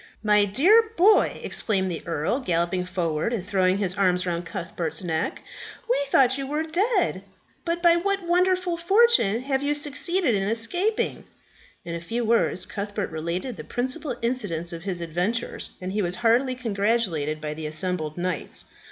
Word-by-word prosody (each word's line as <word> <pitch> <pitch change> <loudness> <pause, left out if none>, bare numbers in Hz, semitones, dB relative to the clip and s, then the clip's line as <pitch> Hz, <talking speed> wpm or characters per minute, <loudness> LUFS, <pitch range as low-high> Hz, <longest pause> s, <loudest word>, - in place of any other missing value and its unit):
"My 210 -1 +4
dear 385 - +4
boy!" 410 +5 +4
exclaimed 190 -4 0
the 165 - -4
earl, 165 - -1
galloping 180 -4 0
forward 170 0 -1
and 215 -7 -3
throwing 190 -1 +2
his 195 -3 0
arms 180 -2 +2
around 175 0 -3
Cuthbert's 170 -3 -4
neck, 160 -2 -2 0.4
"we 480 -10 +2
thought 265 -1 +4
you 270 - -3
were 300 +3 -1
dead. 360 - 0 0.4
But 340 0 -2
by 340 0 +6
what 395 +2 -1
wonderful 360 0 +2
fortune 350 - +4
have 270 0 -1
you 290 +1 0
succeeded 295 +1 0
in 200 - +1
escaping?" 350 - 0 0.6
In 170 - -5
a 170 - -4
few 230 +7 -3
words 220 -5 +1
Cuthbert 205 -1 -4
related 170 +9 -4
the - - -7
principal 255 +2 -2
incidents 195 -9 -1
of 165 +1 -8
his 180 -3 -3
adventures, 180 +8 -2
and 185 0 -5
he 210 +2 0
was 175 -1 -1
heartily 255 +3 +3
congratulated 200 - 0
by 150 0 -4
the 155 0 -5
assembled 155 -1 -3
knights. 180 -3 -3
210 Hz, 160 wpm, -25 LUFS, 175-285 Hz, 0.6 s, by